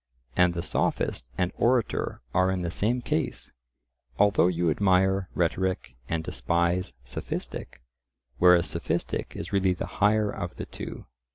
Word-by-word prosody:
And 90 Hz, -1 st, +4 dB
the 85 Hz, -, -2 dB
sophist -, -, -1 dB
and 90 Hz, 0 st, +1 dB
orator 120 Hz, -, +1 dB
are 95 Hz, 0 st, +3 dB
in 95 Hz, -1 st, -1 dB
the 85 Hz, -, -2 dB
same 120 Hz, +7 st, 0 dB
case; -, -, -2 dB, 0.7 s
although 100 Hz, -3 st, +4 dB
you 85 Hz, -2 st, +1 dB
admire 95 Hz, +1 st, +2 dB
rhetoric 90 Hz, -7 st, 0 dB
and 80 Hz, -1 st, -1 dB
despise 85 Hz, +5 st, 0 dB
sophistic, 65 Hz, -1 st, -6 dB, 0.6 s
whereas 90 Hz, -1 st, +6 dB
sophistic -, -, -2 dB
is -, -, -6 dB
really 95 Hz, -2 st, +3 dB
the 90 Hz, -, -4 dB, 0.2 s
higher 105 Hz, 0 st, +4 dB
of 90 Hz, 0 st, -5 dB
the -, -, -5 dB
two. -, -, -8 dB
90 Hz, 135 wpm, -27 LUFS, 85-95 Hz, 0.7 s, whereas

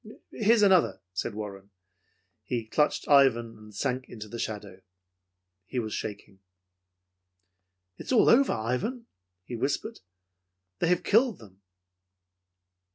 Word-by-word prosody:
"Here's 220 Hz, 0 st, +3 dB
another," 190 Hz, -4 st, +4 dB
said 100 Hz, +3 st, -3 dB
Warren. 100 Hz, -2 st, -7 dB, 0.7 s
He 120 Hz, -3 st, -3 dB
clutched 150 Hz, +7 st, 0 dB
Ivan 120 Hz, -5 st, +4 dB
and 105 Hz, 0 st, -14 dB
sunk 130 Hz, +4 st, -3 dB
into 110 Hz, -2 st, -8 dB
the 115 Hz, +3 st, -7 dB
shadow. 100 Hz, -4 st, -5 dB, 0.9 s
He -, -, -6 dB
was 110 Hz, -3 st, -2 dB
shaking. 100 Hz, -2 st, -6 dB, 1.6 s
"It -, -, -9 dB
is -, -, -3 dB
all 245 Hz, -, +5 dB
over, 270 Hz, +3 st, +5 dB
Ivan," 125 Hz, -, -2 dB, 0.4 s
he 120 Hz, -, -6 dB
whispered. 135 Hz, +5 st, -2 dB, 0.8 s
"They -, -, +1 dB
have 180 Hz, 0 st, +2 dB
killed 230 Hz, 0 st, +3 dB
them." 100 Hz, -3 st, -17 dB
120 Hz, 120 wpm, -28 LUFS, 105-175 Hz, 1.6 s, all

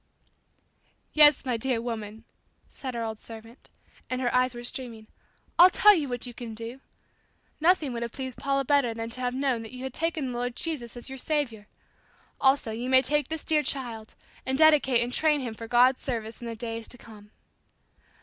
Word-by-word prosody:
"Yes, 295 Hz, -2 st, +7 dB
my 250 Hz, -3 st, 0 dB
dear 245 Hz, 0 st, 0 dB
woman," 225 Hz, -2 st, -6 dB, 0.5 s
said 260 Hz, -3 st, -6 dB
our 230 Hz, -, -2 dB
old 220 Hz, -1 st, -5 dB
servant 225 Hz, +2 st, -12 dB, 0.4 s
and 255 Hz, -, -2 dB
her 245 Hz, -2 st, -1 dB
eyes 255 Hz, 0 st, +2 dB
were 240 Hz, -, -7 dB
streaming 240 Hz, -3 st, -4 dB, 0.5 s
"I'll 355 Hz, +2 st, +10 dB
tell 420 Hz, +3 st, +6 dB
you 305 Hz, -8 st, -1 dB
what 245 Hz, 0 st, -4 dB
you 245 Hz, -, -7 dB
can 230 Hz, -2 st, -8 dB
do. 230 Hz, +4 st, -8 dB, 0.8 s
Nothing 320 Hz, -5 st, +3 dB
would 235 Hz, -, -4 dB
have 235 Hz, -1 st, -3 dB
pleased 260 Hz, -1 st, -6 dB
Paula 275 Hz, 0 st, 0 dB
better 265 Hz, -4 st, +2 dB
than 225 Hz, 0 st, -5 dB
to 255 Hz, -, -4 dB
have 250 Hz, 0 st, -1 dB
known 265 Hz, -3 st, 0 dB
that 225 Hz, +2 st, -9 dB
you 255 Hz, 0 st, -8 dB
had 265 Hz, -1 st, -5 dB
taken 315 Hz, -5 st, -2 dB
the 240 Hz, -, -5 dB
Lord 245 Hz, 0 st, -3 dB
Jesus 260 Hz, -8 st, -3 dB
as 240 Hz, -, -6 dB
your 265 Hz, 0 st, -7 dB
Saviour. 250 Hz, -9 st, -2 dB, 0.7 s
Also 265 Hz, -4 st, +3 dB
you 235 Hz, +3 st, -4 dB
may 260 Hz, 0 st, +5 dB
take 295 Hz, +3 st, +1 dB
this 320 Hz, -1 st, -5 dB
dear 310 Hz, -1 st, +2 dB
child 240 Hz, -6 st, -5 dB, 0.3 s
and 265 Hz, 0 st, -1 dB
dedicate 290 Hz, -6 st, +5 dB
and 245 Hz, +1 st, -4 dB
train 305 Hz, 0 st, +3 dB
him 245 Hz, -4 st, -4 dB
for 225 Hz, +1 st, -8 dB
God's 250 Hz, +2 st, +4 dB
service 230 Hz, -3 st, -4 dB
in 240 Hz, -, -6 dB
the 230 Hz, -, -5 dB
days 230 Hz, 0 st, -5 dB
to 245 Hz, -, -9 dB
come." 210 Hz, -3 st, -14 dB
250 Hz, 200 wpm, -27 LUFS, 230-275 Hz, 0.8 s, I'll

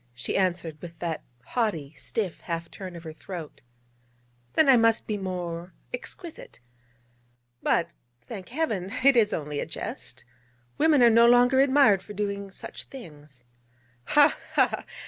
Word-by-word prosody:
she 120 Hz, -, -3 dB
answered 175 Hz, -5 st, 0 dB
with 170 Hz, -1 st, -9 dB
that 165 Hz, -2 st, -3 dB, 0.2 s
haughty, 165 Hz, -, -1 dB
stiff 200 Hz, -3 st, -3 dB
half 165 Hz, -1 st, -4 dB
turn 185 Hz, -2 st, -8 dB
of 170 Hz, -, -9 dB
her 160 Hz, -2 st, -7 dB
throat: 165 Hz, -1 st, -8 dB, 0.9 s
'then 310 Hz, -, +4 dB
I 270 Hz, -, +8 dB
must 230 Hz, -1 st, +3 dB
be 215 Hz, -, -2 dB
more 180 Hz, -2 st, -5 dB, 0.2 s
exquisite. 360 Hz, -9 st, -8 dB, 1.0 s
But, 170 Hz, 0 st, +1 dB, 0.3 s
thank 190 Hz, -, -9 dB
Heaven, 220 Hz, -, -2 dB
it 275 Hz, -1 st, +6 dB
is 220 Hz, -3 st, +4 dB
only 150 Hz, -1 st, -3 dB
a -, -, -2 dB
jest. -, -, -6 dB, 0.5 s
Women 300 Hz, -4 st, +5 dB
are 235 Hz, -, +7 dB
no 230 Hz, +1 st, +6 dB
longer 245 Hz, +2 st, +5 dB
admired 265 Hz, -8 st, +5 dB
for 210 Hz, +2 st, -10 dB
doing 200 Hz, -1 st, -3 dB
such 190 Hz, -, -8 dB
things.' 150 Hz, -, -13 dB, 0.6 s
'Ha! 295 Hz, -, +5 dB, 0.2 s
ha! -, -, +2 dB
195 Hz, 145 wpm, -27 LUFS, 165-240 Hz, 1.0 s, I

